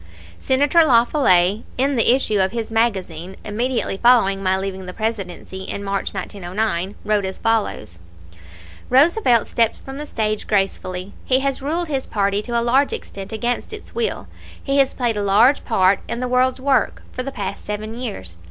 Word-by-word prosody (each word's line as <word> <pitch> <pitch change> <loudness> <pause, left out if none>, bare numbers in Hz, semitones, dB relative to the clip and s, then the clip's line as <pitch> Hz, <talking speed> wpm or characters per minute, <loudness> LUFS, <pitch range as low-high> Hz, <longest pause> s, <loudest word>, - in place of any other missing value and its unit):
] 85 0 -20
Senator 290 +5 +3
La 240 -6 +5
Follette, 195 - +3 0.2
in 275 +2 +1
the 235 -1 +6
issue 215 -6 0
of 190 0 +2
his 230 -1 -4
magazine 190 -6 -1
immediately 230 -1 -1
following 195 -5 +4
my 190 0 +1
leaving 190 -1 -5
the 180 - -6
Presidency 195 -4 -4
in 200 +1 -4
March, 195 0 -2
1909, 190 0 -3
wrote 210 -1 +1
as 190 0 -4
follows: 215 - -1 0.9
"Roosevelt 265 - +4
steps 230 -1 +1
from 270 +1 -9
the 300 - -6
stage 215 -4 -2
gracefully. 195 -2 -2
He 260 0 +2
has 275 0 -1
ruled 330 +5 -2
his 275 -3 -2
party 200 -1 0
to 235 +1 -1
a - - -1
large 270 +4 +3
extent 195 +1 -7
against 240 - -2
its 430 - -9
will. 460 -1 -2 0.4
He 275 0 +1
has 270 -1 +2
played 240 -4 0
a - - 0
large 215 +8 +4
part 190 -3 +3
in 235 - -3
the 250 - -2
world's 255 +1 +2
work, 270 0 +1
for 255 - -4
the 275 +2 -5
past 200 -5 -5
seven 210 +1 -5
years. 95 - -6
220 Hz, 180 wpm, -20 LUFS, 195-255 Hz, 0.9 s, the